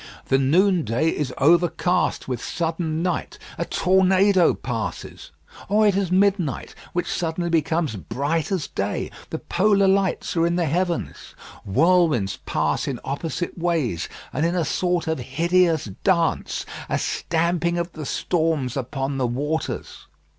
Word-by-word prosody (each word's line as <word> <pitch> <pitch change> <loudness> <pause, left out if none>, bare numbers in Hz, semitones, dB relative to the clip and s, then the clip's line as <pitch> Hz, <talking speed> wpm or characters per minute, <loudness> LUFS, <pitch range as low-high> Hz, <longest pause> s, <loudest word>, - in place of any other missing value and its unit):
The 135 - +4
noonday 160 - +2
is 145 -5 -2
overcast 175 +3 +2
with 125 -3 -3
sudden 165 -1 -2
night; 180 - -2 0.2
a - - 0
tornado 190 0 +3
passes. 115 -4 -5 0.4
Or 215 +2 +4
it 205 -2 +4
is 195 -3 0
midnight, 190 -6 +1 0.2
which 175 - -1
suddenly 170 0 -2
becomes 160 -4 +1
bright 145 - -2
as 185 -7 0
day; 100 +1 -3 0.2
the - - -3
polar 200 +1 +2
lights 190 -2 +1
are 165 0 +3
in 170 - 0
the 175 -1 +1
heavens. 175 +3 -2 0.3
Whirlwinds 135 - +2
pass - - 0
in 130 -4 -3
opposite 165 +6 -3
ways, 160 - -1 0.2
and 150 - 0
in 170 +2 +1
a 170 -3 +1
sort 180 +2 0
of 160 -3 -1
hideous 165 +5 +2 0.2
dance, 170 -4 +1 0.2
a - - +1
stamping 170 +1 0
of 170 0 -2
the 155 -4 -7
storms 160 -7 0
upon 135 +1 -3
the 125 - +1
waters. 145 +6 -3
165 Hz, 140 wpm, -23 LUFS, 140-180 Hz, 0.4 s, The